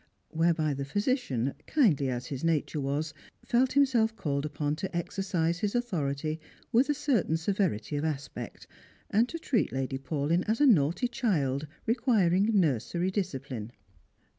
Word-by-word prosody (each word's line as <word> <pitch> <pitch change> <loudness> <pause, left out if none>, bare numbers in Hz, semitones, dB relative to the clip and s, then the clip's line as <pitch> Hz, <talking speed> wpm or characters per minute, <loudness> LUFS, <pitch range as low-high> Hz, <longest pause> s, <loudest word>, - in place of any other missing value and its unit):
whereby 160 -2 +2
the 140 0 -3
physician, 140 - 0
kindly 170 - +3
as 125 -1 -3
his 135 +1 -5
nature 160 -2 0
was, 145 +3 -2 0.3
felt 250 +2 +2
himself 245 -5 +3
called 145 -7 -1
upon 150 0 -2
to 180 +1 -4
exercise 170 -1 -1
his 210 +3 -1
authority 155 - -1 0.3
with 250 +5 +4
a - - +4
certain 230 - +1
severity 165 - -1
of 145 - -1
aspect, 145 -3 -5 0.5
and 230 +4 +3
to 335 - -4
treat 270 -8 0
Lady 135 0 -2
Paulyn 150 +5 0
as 220 +1 +1
a 295 - +5
naughty 175 - +4
child 155 - 0 0.2
requiring 220 -5 +3
nursery 170 - 0
discipline. 135 - -4
165 Hz, 140 wpm, -29 LUFS, 140-220 Hz, 0.5 s, a